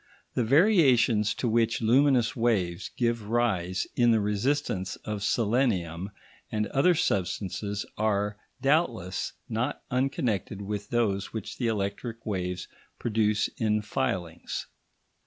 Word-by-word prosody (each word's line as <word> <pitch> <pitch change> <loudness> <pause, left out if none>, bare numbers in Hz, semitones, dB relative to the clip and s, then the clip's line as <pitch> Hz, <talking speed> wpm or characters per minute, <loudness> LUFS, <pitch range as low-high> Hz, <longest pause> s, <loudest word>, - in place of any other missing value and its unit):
The 125 - +1
variations 125 - +4
to 125 - -1
which 115 0 +2
luminous 125 +2 +3
waves 100 -8 0
give 115 -3 0
rise 95 -7 +1
in 120 -1 +4
the 115 -1 +4
resistance 105 -1 -1
of 105 -2 -3
selenium 100 -7 +1 0.4
and 105 0 0
other 175 +6 +3
substances 100 - -1
are, 105 -1 +1 0.3
doubtless, 125 - +1
not 125 +6 -2
unconnected 120 -6 -1
with 105 0 -4
those 105 -5 0
which 110 -3 -6
the 120 - +1
electric 110 +2 -3
waves 90 -3 -3 0.3
produce 105 -2 +1
in 105 -1 +1
filings. 105 -8 -3
110 Hz, 115 wpm, -28 LUFS, 100-120 Hz, 0.4 s, variations